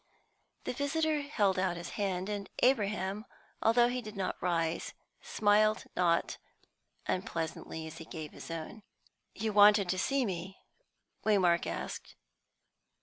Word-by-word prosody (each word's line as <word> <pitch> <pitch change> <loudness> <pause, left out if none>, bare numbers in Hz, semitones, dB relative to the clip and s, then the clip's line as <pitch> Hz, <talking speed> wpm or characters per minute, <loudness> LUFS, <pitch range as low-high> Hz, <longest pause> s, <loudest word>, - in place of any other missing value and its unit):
The - - -3
visitor 305 +3 0
held 205 -10 +1
out 185 -2 0
his 170 - -6
hand, 190 -3 -2
and 205 -1 -4
Abraham, 210 -5 +2 0.4
though 240 +2 +5
he 250 +1 -2
did 215 -2 -9
not 190 - -1
rise, 165 -2 -1 0.3
smiled 215 +1 +3
not 170 -2 +1 0.7
unpleasantly 165 -4 -3
as 160 +1 -8
he 165 - -8
gave 155 -2 -7
his - - -10
own. 165 +6 -6 0.5
"You 220 +1 -2
wanted 205 -1 +7
to 185 - 0
see 275 +4 +1
me?" 190 -1 -4 0.7
Waymark 185 -5 +3
asked. - - -5
200 Hz, 130 wpm, -32 LUFS, 175-220 Hz, 0.7 s, wanted